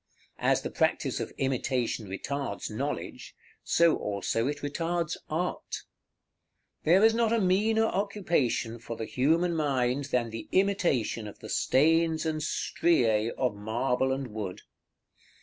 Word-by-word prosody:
As - - +2
the - - -4
practice - - 0
of - - -4
imitation 125 -4 -1
retards 100 +1 -4
knowledge, - - -4 0.3
so 170 -1 +4
also 105 +4 -1
it 145 0 -4
retards 165 +3 -1
art. 175 +4 -3 1.0
There 185 +7 +6
is 225 - +5
not 230 -1 +2
a 230 - +3
meaner 215 +4 +3
occupation 175 - 0
for 115 0 -6
the 110 - -3
human 165 +8 +1
mind 135 -3 0
than 125 -4 -1
the 115 0 -7
imitation 175 - +1
of 105 - -10
the - - -10
stains 160 +3 +2
and 155 -1 -1
striæ 120 -9 +1
of 125 -4 +1
marble 120 +5 0
and 135 -1 -2
wood. 105 -4 -5
140 Hz, 130 wpm, -28 LUFS, 115-170 Hz, 1.0 s, There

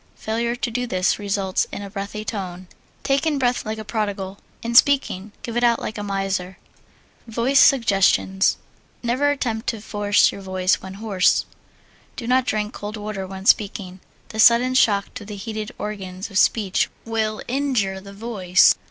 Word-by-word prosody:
Failure 235 +2 -2
to 245 -1 -3
do 245 +2 -2
this 185 -2 +1
results 200 -2 -1
in 205 - -6
a 200 - -7
breathy 205 +1 -5
tone. 185 -4 -5 0.4
Take 275 +3 +1
in 300 -2 +1
breath 245 -3 0
like 220 0 -3
a 215 - -7
prodigal; 205 -3 -3 0.2
in 235 +1 -3
speaking, 235 -6 +3
give 235 - -5
it 240 - +1
out 235 -1 +4
like 215 - -5
a - - -3
miser. 195 -2 -2 0.7
Voice 240 +5 +2
Suggestions 195 -5 +4 0.5
Never 255 +5 +1
attempt 240 -6 -2
to 225 - -1
force 205 -1 +2
your 200 - -9
voice 185 -1 0
when 190 0 -8
hoarse. 200 -3 +2 0.7
Do 235 - -6
not 255 +1 +2
drink 210 0 -1
cold 210 +1 -6
water 205 -2 -5
when 190 0 -8
speaking. 195 -3 +1 0.3
The 220 - -7
sudden 240 +3 +6
shock 205 -6 +2
to 250 - -7
the 205 0 -8
heated 215 +1 -5
organs 195 -2 -6
of 200 - +2
speech 205 -5 +2 0.2
will 220 -1 -2
injure 245 -8 0
the 200 +1 -11
voice. 200 -4 +3
210 Hz, 170 wpm, -22 LUFS, 195-235 Hz, 0.7 s, sudden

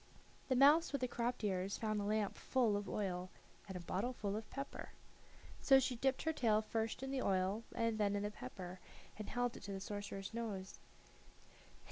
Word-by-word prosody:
The 260 - +4
mouse 295 +6 +7
with 280 -2 -1
the 255 - +2
cropped 240 0 -1
ears 195 -1 0
found 215 -2 0
a - - -2
lamp 210 -1 +1
full 240 -6 +2
of 205 -1 -2
oil 185 -3 -2 0.4
and 190 -2 -4
a - - -6
bottle 195 +9 -1
full 205 -4 -2
of 220 0 -5
pepper. 275 0 -6 0.7
So 270 -1 +7
she 260 -1 0
dipped 265 +2 +1
her 320 - +1
tail 220 -6 +3
first 225 +3 -2
in 270 - -3
the 270 -1 0
oil 195 +2 +1
and 230 -2 +1
then 205 -1 +2
in 200 - 0
the 210 - -1
pepper, 185 -3 -7 0.4
and 215 - -5
held 245 -1 0
it - - -11
to 200 - -6
the 195 - -3
sorcerer's 205 0 -5
nose. 210 -5 -4
215 Hz, 195 wpm, -38 LUFS, 200-245 Hz, 0.7 s, mouse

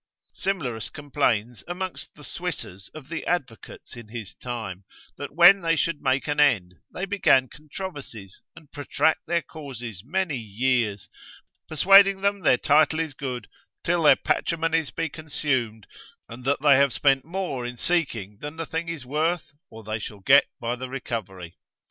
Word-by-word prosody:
Simlerus 125 - -2
complains 125 -6 -1
amongst 180 +1 -5
the 150 - -14
Swissers 140 - -6
of 150 -4 -10
the 165 - -5
advocates 135 -12 -4
in 120 -2 -10
his 110 -3 -7
time, 110 -7 -6 0.3
that 145 0 -8
when 180 +4 +8
they 165 -1 +2
should 165 -1 -1
make 135 0 +1
an 145 0 -1
end, 105 -12 +3 0.2
they 190 - -4
began 185 -10 +3
controversies, 145 - -9
and 160 -3 -16
protract 150 +2 +1
their 170 0 +1
causes 125 - -8
many 165 +1 -1
years, 110 -1 -1 0.6
persuading 195 +5 +6
them 200 0 +1
their 145 -8 +4
title 150 +3 +3
is 160 -3 -2
good, 125 -5 -5 0.4
till 170 0 +1
their 150 - +7
patrimonies 165 -2 0
be 165 - -2
consumed, 135 -8 -2 0.4
and 120 +2 -10
that 140 0 +1
they 140 -3 +7
have 140 -1 +3
spent 135 -2 +3
more 170 -7 -3
in 120 0 -5
seeking 115 - -1
than 150 +1 -7
the 165 - -3
thing 165 +1 -4
is 160 -6 -5
worth, 155 +6 -1 0.2
or 110 0 -11
they 110 +1 -3
shall 105 -1 -8
get 140 +7 +6
by 120 +1 -2
the 130 +1 -7
recovery. 95 -10 -6
140 Hz, 160 wpm, -25 LUFS, 120-165 Hz, 0.6 s, when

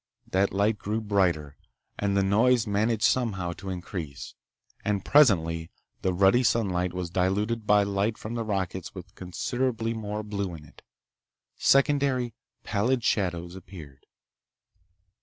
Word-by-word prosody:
That 95 +1 +2
light 105 +2 +1
grew 105 +2 -2
brighter—and 100 0 -2
the 100 - +3
noise 115 +5 +3
managed 110 +2 0
somehow 100 -9 +1
to 95 +2 -8
increase—and 90 +3 -6
presently 85 - +4 0.3
the 95 - +1
ruddy 95 +6 +4
sunlight 95 -7 +1
was 90 -1 -4
diluted 105 +5 0
by 105 -1 +5
light 100 +2 -1
from 110 - -6
the 115 -1 -2
rockets 95 -4 -3
with - - -10
considerably 115 +5 -2
more 105 -1 -4
blue 100 -4 -3
in 75 -1 -12
it. 70 - -18 0.7
Secondary, 135 -3 +2 0.3
pallid 115 +5 0
shadows 90 -4 -1
appeared. 80 -8 -12
100 Hz, 120 wpm, -27 LUFS, 90-115 Hz, 0.7 s, by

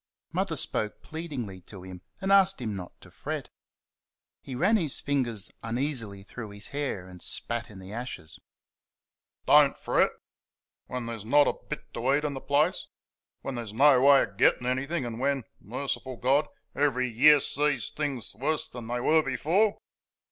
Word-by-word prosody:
Mother - - 0
spoke 105 -1 -1
pleadingly 140 - -6
to 95 -3 -10
him 90 -1 -9 0.2
and 195 0 0
asked 195 -1 +5
him 110 -5 -3
not 90 -2 -8
to - - -15
fret. - - -5 0.9
He 130 - -7
ran 190 - +3
his 165 -10 +4
fingers 120 -8 -1
uneasily 115 -4 -2
through 110 +2 -8
his 100 0 -6
hair 140 -10 -3
and 90 -1 -12
spat 120 0 -2
in 105 - -12
the 95 +2 -10
ashes. 115 -10 -6 1.1
"Don't - - +6
fret? - - +2 0.8
When 125 -2 -4
there's 115 -3 -5
not 145 +6 +5
a - - +2
bit - - -9
to 130 +4 +1
eat 150 - 0
in 145 - -1
the 135 - -6
place 150 +6 +1 0.5
when 135 - -4
there's 115 -4 -6
no 135 +1 +6
way 140 0 +7
of 100 - -8
getting 125 - +3
anything, 130 +4 -1
and 115 -1 -5
when 135 -1 0 0.2
merciful 130 +3 -4
God! 135 +5 +2 0.3
every 130 -3 +1
year 140 +6 +6
sees 140 -3 -1
things 135 - -4
worse 145 +9 -1
than 120 -2 -9
they 120 +1 -2
were 160 +5 +4
before." 170 +10 +1
130 Hz, 165 wpm, -28 LUFS, 115-145 Hz, 1.1 s, way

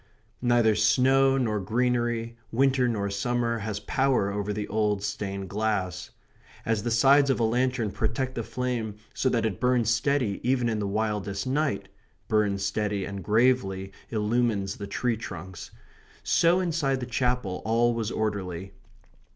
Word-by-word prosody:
Neither 120 -3 +4
snow 135 +5 +4
nor 110 -5 0
greenery, 120 +2 0 0.2
winter 130 +1 +3
nor 100 -4 -1
summer, 115 +3 -1
has 105 -1 -3
power 130 -2 +1
over 105 0 -2
the 105 0 -3
old 105 -1 0
stained 100 -1 -4
glass. 100 -3 -2 0.6
As 110 -2 0
the 120 - -2
sides 135 +5 +5
of 135 - +1
a - - +2
lantern 120 -1 +1
protect 130 +6 -2
the 120 - -3
flame 115 -2 -3 0.2
so 130 - +1
that 115 -2 +1
it 100 -5 -2
burns 125 -3 +2
steady 115 -3 +1
even 125 -1 +1
in 110 -2 -1
the 100 - -1
wildest 105 -2 -2
night 140 -3 -1 0.4
burns 100 -2 +1
steady 105 -2 -1
and 100 -1 -6
gravely 105 -3 +2 0.2
illumines 105 -3 0
the 100 - -6
tree 115 +3 -1
trunks 95 -5 -8 0.5
so 170 +2 +3
inside 155 -7 0
the 125 - -4
Chapel 125 -5 -1
all 115 +2 +2
was 115 -2 -2
orderly. 95 -5 -3
115 Hz, 150 wpm, -27 LUFS, 100-125 Hz, 0.6 s, sides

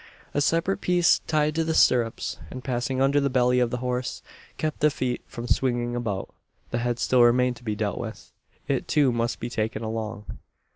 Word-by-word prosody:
"A 145 - +1
separate 165 +6 +1
piece 175 -1 +4
tied 155 -1 +2
to 165 +1 +1
the 160 0 -1
stirrups, 120 -3 +2
and 130 -1 -8
passing 130 +1 -2
under 135 +2 +3
the 140 - +1
belly 125 -1 +3
of 125 -1 +2
the 125 - -2
horse, 125 0 -2 0.3
kept 155 -1 -2
the 150 - +4
feet 130 -4 -2
from 120 - -7
swinging 120 -1 0
about. 105 -5 -3 0.4
"The 120 - 0
head 120 0 -1
still 125 0 +3
remained 125 +1 +4
to - - -16
be 110 -3 -2
dealt 105 -1 -2
with. 115 -2 -7 0.4
It - - -1
too 145 -4 +3
must 120 0 -1
be 120 - -4
taken 110 -1 -2
along. 110 -1 -4
125 Hz, 195 wpm, -25 LUFS, 120-140 Hz, 0.4 s, piece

